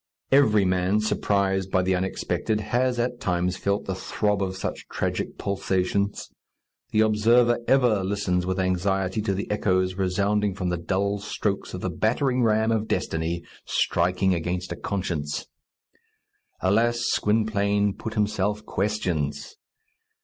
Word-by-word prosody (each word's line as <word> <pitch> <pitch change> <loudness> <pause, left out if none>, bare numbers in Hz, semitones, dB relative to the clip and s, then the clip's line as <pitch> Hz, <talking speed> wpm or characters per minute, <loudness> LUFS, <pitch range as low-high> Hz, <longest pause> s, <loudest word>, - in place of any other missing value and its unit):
Every 110 -8 +5
man, 90 +2 +2
surprised 100 -3 0
by 95 -1 +2
the 95 +1 +1
unexpected, 95 +3 -1
has 120 +4 0
at 120 0 -1
times 90 -1 0
felt 100 +2 -1
the 95 - -2
throb 105 +2 -1
of 95 -1 -2
such - - -5
tragic - - -3
pulsations. 100 0 -1 0.6
The 110 - +2
observer 115 +3 +4
ever 120 -7 +3
listens 95 -2 0
with 95 +1 -2
anxiety 95 +2 0
to 100 -2 -1
the 100 - -3
echoes 95 -3 +1
resounding 100 +2 0
from 90 -2 -2
the 90 - -1
dull 100 +4 -1
strokes 100 -1 -3
of 90 - -6
the 95 - -2
battering 125 - +1
ram 110 -1 +3
of 110 -1 0
destiny 85 +1 -2 0.2
striking 90 +2 +1
against 90 +2 -3
a - - -2
conscience. 80 -7 -3 1.2
Alas! 115 +5 +2
Gwynplaine 105 -2 +1
put 110 +2 -6
himself 105 0 0
questions. 85 -8 -2
100 Hz, 135 wpm, -25 LUFS, 90-105 Hz, 1.2 s, Every